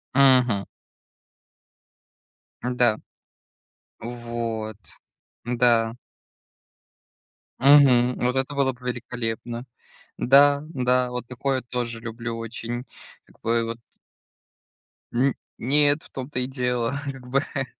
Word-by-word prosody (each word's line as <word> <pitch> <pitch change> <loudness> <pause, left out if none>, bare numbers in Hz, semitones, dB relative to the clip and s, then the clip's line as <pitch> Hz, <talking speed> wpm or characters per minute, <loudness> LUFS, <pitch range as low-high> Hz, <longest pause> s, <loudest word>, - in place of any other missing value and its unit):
Мгм. 125 -7 +4 2.0
Да. 125 -3 +2 1.0
Вот. 115 -2 -4 0.7
Да. 120 -1 +2 1.6
Мгм. 130 -3 +6
Вот 125 +1 +1
это 135 +2 -1
было 135 -1 +2
бы 125 +1 -10
великолепно. 120 0 -4 0.5
Да 140 +2 +5
да. 125 -3 +1
Вот 125 -1 -5
такое 130 +1 -2
тоже 120 -1 -4
люблю 115 0 -5
очень. 115 +2 -5 0.4
Как - - -24
бы 115 0 +1
вот 115 0 -4 1.4
Н 130 +2 +2 0.2
нет, 145 +4 +3
в - - -16
том-то 130 0 -5
и 125 - -1
дело. 125 -2 -1 0.2
Как 130 -2 -12
бы, 135 +2 +2
э, 135 -2 -1
125 Hz, 100 wpm, -24 LUFS, 115-130 Hz, 2.0 s, Мгм